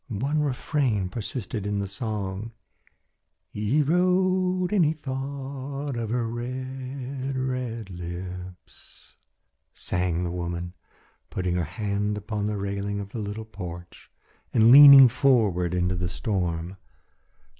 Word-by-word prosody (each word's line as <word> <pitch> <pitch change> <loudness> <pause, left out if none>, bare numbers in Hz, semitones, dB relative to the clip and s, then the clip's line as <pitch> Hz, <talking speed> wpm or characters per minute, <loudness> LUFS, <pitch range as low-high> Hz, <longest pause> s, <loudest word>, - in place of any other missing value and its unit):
One 135 +8 -1
refrain 130 - 0
persisted 105 -1 -5
in 105 0 -1
the 100 - -1
song 105 0 -4 1.0
"He 110 +9 +1
rode 185 +3 +2
and 195 -4 +4
he 155 0 +2
thought 140 0 -5
of 115 -2 -3
her 120 0 0
red, 130 +2 -5
red 125 -5 -3
lips," 90 +1 -9 0.6
sang 90 -1 -1
the 85 - -2
woman, 85 0 -4 0.6
putting 90 -1 -2
her 90 -2 0
hand 105 +4 -2
upon 105 0 -3
the 105 -1 -2
railing 100 +1 -3
of 100 -1 -6
the 115 - -6
little 105 +1 -5
porch 90 -5 -9 0.4
and 115 +1 +5
leaning 140 -1 +11
forward 110 -10 +2
into 90 0 +1
the 90 0 -2
storm. 90 -4 -2
110 Hz, 120 wpm, -26 LUFS, 95-135 Hz, 1.0 s, leaning